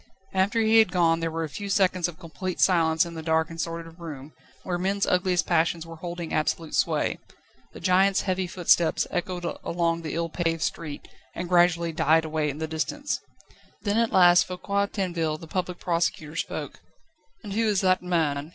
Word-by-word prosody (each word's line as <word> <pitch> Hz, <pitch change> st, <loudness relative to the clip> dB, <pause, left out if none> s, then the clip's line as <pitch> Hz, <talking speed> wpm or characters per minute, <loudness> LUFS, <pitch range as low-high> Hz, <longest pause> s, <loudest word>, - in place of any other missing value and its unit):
After 195 Hz, +4 st, +2 dB
he 225 Hz, 0 st, +5 dB
had 220 Hz, -5 st, +4 dB
gone 165 Hz, -3 st, +3 dB
there 165 Hz, 0 st, -1 dB
were 165 Hz, 0 st, -3 dB
a -, -, -2 dB
few 200 Hz, +7 st, -6 dB
seconds 185 Hz, -3 st, +2 dB
of 170 Hz, -2 st, -9 dB
complete 185 Hz, +1 st, -6 dB
silence 165 Hz, -3 st, +3 dB
in 170 Hz, -, -8 dB
the 160 Hz, -, -6 dB
dark 160 Hz, 0 st, +1 dB
and 165 Hz, 0 st, -4 dB
sordid 165 Hz, 0 st, -6 dB
room, 150 Hz, -4 st, -8 dB, 0.3 s
where 175 Hz, -1 st, -2 dB
men's 195 Hz, +2 st, 0 dB
ugliest 180 Hz, -1 st, +1 dB
passions 165 Hz, -1 st, +1 dB
were 165 Hz, 0 st, -10 dB
holding 170 Hz, 0 st, -6 dB
absolute 155 Hz, +1 st, -1 dB
sway. -, -, +1 dB, 0.5 s
The -, -, -10 dB
giant's 190 Hz, +2 st, +3 dB
heavy 185 Hz, -1 st, -1 dB
footsteps 175 Hz, -2 st, +2 dB
echoed 175 Hz, 0 st, -3 dB, 0.2 s
along 170 Hz, -1 st, 0 dB
the 160 Hz, -2 st, -5 dB
ill 165 Hz, 0 st, -1 dB
paved 165 Hz, -1 st, -1 dB
street, 155 Hz, -4 st, -4 dB, 0.3 s
and 175 Hz, -, -4 dB
gradually 175 Hz, -1 st, +3 dB
died 160 Hz, 0 st, +3 dB
away 155 Hz, -1 st, -1 dB
in 140 Hz, -, -5 dB
the 160 Hz, -, -2 dB
distance. 160 Hz, -, -2 dB, 0.6 s
Then 210 Hz, +1 st, +1 dB
at 230 Hz, -1 st, +1 dB
last 175 Hz, -1 st, +6 dB
Foucquier 200 Hz, +2 st, -1 dB
Tinville, 170 Hz, -6 st, -2 dB
the 165 Hz, -, -9 dB
Public 180 Hz, +1 st, -3 dB
Prosecutor, 165 Hz, -3 st, -1 dB
spoke: -, -, -4 dB, 0.6 s
"And 205 Hz, -2 st, -6 dB
who 225 Hz, +2 st, +1 dB
is 205 Hz, -3 st, +2 dB
that 185 Hz, -1 st, +3 dB
man?" 160 Hz, -5 st, -1 dB
170 Hz, 185 wpm, -26 LUFS, 160-185 Hz, 0.6 s, last